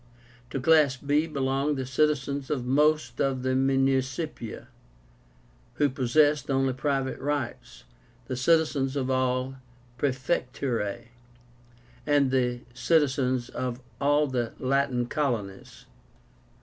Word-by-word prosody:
To 135 - -3
class 145 -2 +4
b 145 +4 +1
belonged 140 0 -1
the 130 - -3
citizens 140 0 0
of 135 -5 -2
most 150 +4 +2
of 135 -2 0
the 130 - 0
Municipia, 135 0 0 1.1
who 145 -1 +2
possessed 145 +2 +2
only 135 -1 +1
private 135 0 -1
rights, 140 - -4 0.4
the 130 - -4
citizens 140 -1 +2
of 130 -2 -1
all 130 0 +1
the 135 - -11 0.5
Praefectúrae, 125 -5 -2 1.0
and 145 -3 +3
the 125 -2 0
citizens 130 -4 +1
of 125 -1 -4 0.2
all 145 +2 +3
the 125 -4 -2
Latin 130 -2 0
colonies. 120 -9 -3
135 Hz, 110 wpm, -27 LUFS, 130-145 Hz, 1.1 s, class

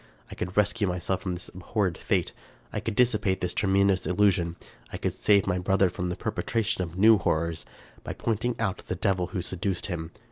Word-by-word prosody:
I - - -6
could 90 +2 -5
rescue 105 0 +3
myself 90 +1 -1
from 90 -2 -2
this 85 - -8
abhorred 95 0 -1
fate; - - 0 0.4
I - - -1
could 115 - -3
dissipate 110 -6 +2
this 90 - -2
tremendous 95 -1 +2
illusion; 90 -3 +2 0.4
I - - -4
could - - -2
save 100 -2 +3
my 90 -2 0
brother 95 0 +2
from 90 0 -3
the 90 - -2
perpetration 110 -1 -1
of 85 -1 -5
new 110 +2 +7
horrors, 80 -2 -1 0.4
by - - -4
pointing 115 +2 -1
out 95 -5 -1
the - - -2
devil 95 -1 0
who 90 -5 -4
seduced 90 +1 -2
him. 80 -4 -4
95 Hz, 190 wpm, -27 LUFS, 90-105 Hz, 0.4 s, new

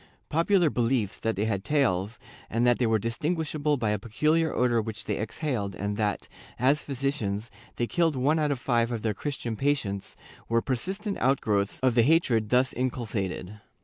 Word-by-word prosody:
^ - - -25 0.3
Popular 170 0 +3
beliefs 115 -4 0
that 115 0 -1
they 100 +3 0
had 100 -3 -1
tails, 115 -7 +1 0.3
and 115 +2 +1
that 120 -1 +4
they 120 - +2
were 110 0 +3
distinguishable 150 - -1
by 110 -4 0
a 105 - 0
peculiar 155 +9 +1
odor 120 -2 +2
which 110 -1 -6
they 105 - -2
exhaled 110 -3 -2
and 100 +1 -2
that, 105 -1 -1 0.3
as 135 +5 +3
physicians, 120 -6 -2 0.2
they 120 - 0
killed 165 +2 +1
one 145 +5 +2
out 150 -1 +1
of 140 - 0
five 120 -1 +1
of 115 -3 -3
their 110 -2 +1
Christian 120 -1 -4
patients, 110 -7 -1 0.3
were 115 0 +3
persistent 190 - -2
outgrowths 105 -7 +1
of 130 -2 +3
the 120 - +5
hatred 120 -6 +3
thus 125 +2 +3
inculcated. 105 -5 -3
120 Hz, 180 wpm, -27 LUFS, 110-145 Hz, 0.3 s, the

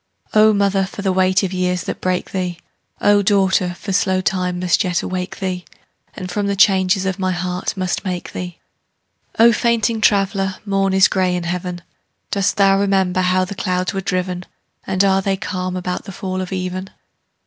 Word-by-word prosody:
O 215 0 +6
mother, 200 -2 +1
for 200 - -8
the 190 - +2
weight 185 +1 +3
of 190 -1 -2
years 180 -1 0
that - - -5
break 185 -1 -1
thee! 180 -2 -2 0.4
O 205 0 +5
daughter, 190 -2 +2
for 195 +2 -5
slow 190 -1 +2
time 180 -1 -1
must 180 -1 +2
yet 180 -2 -1
awake 185 0 -4
thee, 185 -2 -3 0.5
And 185 -2 -6
from 205 +2 -1
the 200 - 0
changes 190 -1 +3
of 190 0 -2
my 185 -1 0
heart 180 +2 -3
must 185 -1 -2
make 180 -3 -4
thee! 180 -1 -6 0.8
O 230 +1 +7
fainting 230 -1 +1
traveller, 195 -2 +2
morn 195 -1 +1
is 190 - +6
gray 185 -1 +1
in 175 - -2
heaven. 175 0 -4 0.5
Dost 200 -2 +1
thou 195 -1 +4
remember 190 -2 +1
how 185 0 +2
the 185 - -6
clouds 185 -1 -1
were 195 - -2
driven? 180 -1 -2 0.4
And 190 0 +2
are 195 -1 +3
they 195 0 0
calm 185 -2 -3
about 180 0 -3
the 195 - -7
fall 185 0 -4
of 185 - -6
even? 185 0 -3
185 Hz, 185 wpm, -19 LUFS, 180-195 Hz, 0.8 s, O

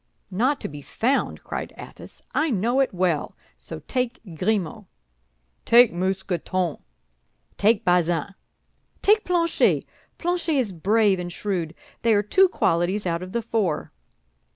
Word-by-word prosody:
"Not 255 +9 +1
to - - -3
be 145 -1 -9
found!" 255 - -1
cried - - -5
Athos. - - -12
"I 310 +1 +1
know 240 +3 +1
it 270 - +2
well, 175 -5 -1 0.2
so - - -8
take 250 -2 -1
Grimaud." 185 0 -1 0.8
"Take 240 -2 +6
Mousqueton." 185 -2 -1 0.8
"Take 210 0 +2
Bazin." 175 0 +1 0.7
"Take 425 +1 +4
Planchet. 340 -2 +2 0.3
Planchet 350 -2 -1
is 250 -7 +1
brave 200 +3 +2
and 175 0 -5
shrewd; 175 -4 -3 0.3
they 230 -2 +3
are 205 - +2
two 380 - +4
qualities 185 - 0
out 170 -1 -1
of 185 0 -7
the 235 +2 -2
four." 210 -9 -1
200 Hz, 130 wpm, -24 LUFS, 175-245 Hz, 0.8 s, Take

